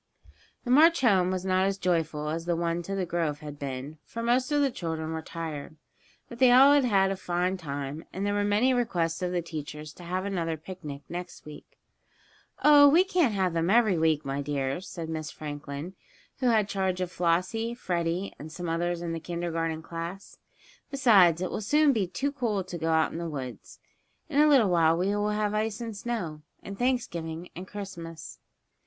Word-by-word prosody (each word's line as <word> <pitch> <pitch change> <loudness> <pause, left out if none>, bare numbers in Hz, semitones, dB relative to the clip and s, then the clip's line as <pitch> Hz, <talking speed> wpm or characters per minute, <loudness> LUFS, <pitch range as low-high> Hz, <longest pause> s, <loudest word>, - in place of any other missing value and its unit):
The 245 - -2
march 325 +4 +6
home 190 -7 +4
was 185 0 -2
not 185 0 +2
as 195 0 -1
joyful 160 -5 -1
as 165 +2 -3
the 175 -1 +1
one 170 0 -1
to 195 +3 -4
the 190 -2 -1
grove 165 -4 -2
had 145 -1 -8
been, 140 +2 -6
for 230 - -6
most 250 +3 +1
of 295 - +3
the 280 -2 +2
children 160 -5 -4
were 160 0 -3
tired. 160 -2 -6 0.5
But 235 - -11
they 255 -2 +6
all 270 +3 +8
had 285 -3 +4
had 195 -4 +3
a - - -1
fine 180 0 -1
time, 145 -2 -5
and 195 +2 -3
there 205 - 0
were 205 0 +1
many 210 +6 +3
requests 175 -10 0
of 180 -1 -1
the 175 -1 -1
teachers 150 -2 -7
to 180 - -13
have 185 +2 -3
another 170 -5 -2
picnic 155 -4 -8
the - - -11
next 180 0 -7
week. 150 -1 -12 0.9
"Oh, 290 -1 +8
we 335 +6 +6
can't 350 - +1
have 185 -3 +1
them 165 +1 0
every 220 -2 +4
week, 160 -2 +1
my 135 +1 -2
dears," 140 +4 -3
said 165 -2 -6
Miss 155 -2 -4
Franklin, 145 +2 -7 0.5
who 255 - +1
had 220 -4 +3
charge 190 -2 -1
of 180 -1 -2
Flossie, 185 +8 0
Freddie 175 -3 -2
and 155 +2 -9
some 175 +2 -6
others 170 +1 -1
in 170 -1 -3
the 165 - -3
kindergarten 165 -1 -3
class. 170 +4 -7 0.5
"Besides, 195 - +5
it 185 - -3
will - - -3
soon 295 +6 +4
be 205 -6 0
too 270 +11 -2
cool 230 -8 -1
to 180 -1 -7
go 165 +1 -1
out 160 -1 +2
in 165 - -5
the 170 -1 -4
woods. 130 -5 -7 0.5
In 290 -1 +3
a 305 - +6
little 255 -9 +5
while 165 -1 +4
we 185 +3 0
will 205 0 0
have 210 0 0
ice 215 0 -1
and 230 -2 -5
snow, 200 -9 -4 0.2
and 200 - -7
Thanksgiving 175 -10 -2
and 185 +2 -7
Christmas." 175 -6 -8
180 Hz, 200 wpm, -28 LUFS, 160-210 Hz, 0.9 s, all